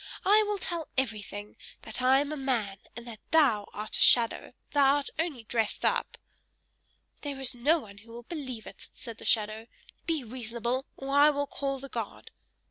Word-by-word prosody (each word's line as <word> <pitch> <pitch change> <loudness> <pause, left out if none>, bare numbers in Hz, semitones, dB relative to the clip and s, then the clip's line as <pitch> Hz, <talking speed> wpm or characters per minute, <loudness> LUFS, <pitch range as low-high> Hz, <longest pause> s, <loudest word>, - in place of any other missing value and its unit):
I 415 +3 +6
will 415 -1 0
tell 340 -4 -4
everything! 210 -4 -3 0.3
That - - -4
I 260 +2 +5
am 290 +1 -3
a - - -2
man, 235 -9 -1 0.2
and 235 0 -8
that 225 -3 -8
thou 260 -11 +4
art 210 +1 -4
a - - -2
shadow 235 -2 +5 0.2
thou 280 -1 +5
art 285 -1 -2
only 310 -8 -2
dressed 220 -1 -1
up!" - - 0 1.0
"There 285 -2 -5
is 265 -2 +1
no 280 +7 +3
one 205 -9 -10
who 225 +2 -15
will 240 +1 -9
believe 255 -6 -6
it!" 195 - -10
said 230 -1 -9
the - - -10
shadow. 215 +1 +1 0.4
"Be 320 -5 0
reasonable, 240 +2 -3
or 275 +1 -3
I 290 +1 +7
will 285 -1 0
call 275 -1 -3
the 275 - -8
guard!" 230 -5 -6
255 Hz, 185 wpm, -29 LUFS, 225-285 Hz, 1.0 s, I